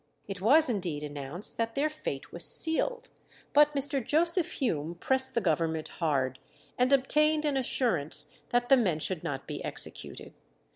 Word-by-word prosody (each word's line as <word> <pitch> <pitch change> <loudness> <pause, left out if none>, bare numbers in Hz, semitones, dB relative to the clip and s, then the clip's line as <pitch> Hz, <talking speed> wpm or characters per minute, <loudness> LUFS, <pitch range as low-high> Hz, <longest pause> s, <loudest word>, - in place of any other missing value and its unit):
It 195 -2 -6
was 295 +10 +5
indeed 175 - -2
announced 145 +5 0
that 230 0 -1
their 285 +2 +2
fate 300 - -6
was 170 - -7
sealed; 480 - 0 0.4
but 295 0 +5
Mr. 275 -1 +2
Joseph 335 - +1
Hume 170 - -2
pressed 265 +8 0
the 235 - +2
Government 160 -2 -1
hard, 135 -5 0 0.4
and 250 +2 +1
obtained 300 +3 +3
an 290 -2 +1
assurance 175 - 0 0.2
that 245 0 0
the 270 - +7
men 190 -10 +1
should 160 +1 -3
not 135 -1 -4
be - - -6
executed. - - -6
235 Hz, 155 wpm, -29 LUFS, -, 0.4 s, the